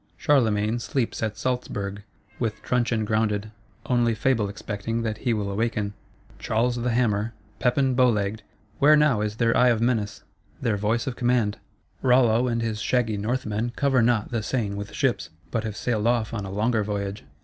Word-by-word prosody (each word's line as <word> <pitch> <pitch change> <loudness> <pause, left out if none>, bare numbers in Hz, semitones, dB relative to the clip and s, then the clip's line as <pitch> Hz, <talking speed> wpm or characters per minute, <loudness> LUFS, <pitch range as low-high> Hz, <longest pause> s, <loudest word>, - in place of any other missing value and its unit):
Charlemagne 110 -4 +2
sleeps 120 0 -2
at 110 -1 -2
Salzburg, 105 -6 -3 0.4
with 110 -3 -2
truncheon 120 -3 0
grounded; 110 -1 0 0.3
only 120 -2 +2
Fable 110 -2 +1
expecting 110 +2 -4
that 110 -1 -3
he 125 - 0
will 105 -3 -1
awaken. 105 -1 -1 0.5
Charles 120 +2 0
the 120 +1 -1
Hammer, 115 -2 +1 0.3
Pepin 130 +1 +2
Bow 125 0 +4
legged, 105 -1 -1 0.4
where 150 +2 +7
now 150 -8 +3
is 105 0 -2
their 115 0 +2
eye 125 0 +5
of 115 -2 +2
menace, 115 -3 -1 0.4
their 115 -4 0
voice 110 +4 0
of 130 -3 -3
command? 120 -4 +1 0.4
Rollo 125 -1 +4
and 115 -1 0
his 110 -2 -2
shaggy 120 -4 +1
Northmen 110 +1 -2
cover 135 -3 +2
not 115 -1 +1
the 115 -2 -1
Seine 110 -2 -1
with 100 0 -6
ships; - - 0 0.2
but 115 -2 -1
have 105 -1 -4
sailed 110 0 0
off 115 -2 +1
on 105 -3 -3
a 95 - -6
longer 110 +2 +1
voyage. 100 0 -3
115 Hz, 170 wpm, -25 LUFS, 105-125 Hz, 0.5 s, where